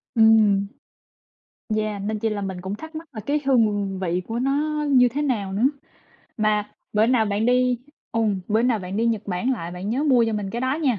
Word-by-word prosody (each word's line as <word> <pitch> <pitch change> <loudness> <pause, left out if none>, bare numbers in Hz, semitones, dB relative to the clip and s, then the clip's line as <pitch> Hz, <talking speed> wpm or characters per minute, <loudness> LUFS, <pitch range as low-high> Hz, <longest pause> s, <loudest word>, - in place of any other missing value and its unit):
Ừm, 215 -3 +5 1.1
Yeah, 215 -2 -2
nên 215 +1 -2
chi 225 - 0
là 210 -1 -3
mình 190 -2 -4
cũng 190 +2 -4
thắc 315 +7 -10
mắc 320 0 -7
là 215 - -6
cái 290 +6 -1
hương 205 -7 +2
vị 180 -1 -1
của 230 +1 -2
nó 300 +3 0
như 250 -2 +6
thế 285 +5 -3
nào 210 -9 -1
nữa, 205 +4 -1 0.7
mà 210 -1 +1 0.2
bữa 215 +1 +3
nào 240 -3 +3
bạn 205 +3 0
đi 250 -1 +3 0.3
ừm, 215 -4 +1
bữa 220 +2 +2
nào 240 -3 +2
bạn 185 +1 -5
đi 230 +1 +1
Nhật 220 -2 0
Bản 200 +8 -1
lại, 175 -8 -4
bạn 180 +3 -6
nhớ 265 +5 0
mua 250 -5 +4
cho 225 - -1
mình 205 -2 -3
cái 235 - -4
đó 260 +2 0
nha. 250 -8 +2
220 Hz, 220 wpm, -23 LUFS, 200-250 Hz, 1.1 s, như